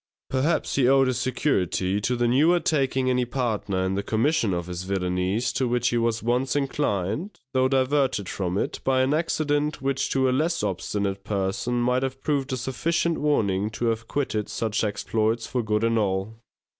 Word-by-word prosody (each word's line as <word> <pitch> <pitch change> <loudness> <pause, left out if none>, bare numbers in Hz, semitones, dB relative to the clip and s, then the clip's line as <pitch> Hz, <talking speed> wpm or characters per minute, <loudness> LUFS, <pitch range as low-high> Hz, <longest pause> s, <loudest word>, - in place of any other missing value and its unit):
Perhaps 135 +6 +1
he 130 -3 +3
owed 135 0 +5
his 130 -2 0
security 105 - 0
to 125 +4 0
the 120 0 +1
newer 155 +9 +4
taking 135 -5 +1
any 125 -1 +2
partner 115 -7 -1
in 95 - 0
the 100 - -1
commission 115 +2 +1
of 85 -1 -2
his 90 0 -5
villainies 95 +3 -1
to 130 - 0
which 120 0 +1
he 120 - 0
was 115 -1 0
once 125 +4 0
inclined, 140 - -1
though 130 0 +3
diverted 130 -5 +1
from 90 0 -2
it - - -2
by 130 -1 +2
an 135 +3 +1
accident 150 -2 0
which 135 0 -1
to 130 -1 +2
a - - +2
less 160 +4 0
obstinate 100 0 -2
person 100 +4 -1
might 125 +1 +2
have 135 0 -3
proved 140 -3 0
a 130 - -1
sufficient 165 +7 -1
warning 105 -9 +1
to 110 +2 -4
have 115 0 -3
quitted 110 -7 -2
such 110 -1 -1
exploits 110 +2 0
for 125 - -1
good 105 -1 0
and 115 0 +2
all. 100 +2 -2
120 Hz, 180 wpm, -25 LUFS, 105-135 Hz, -, owed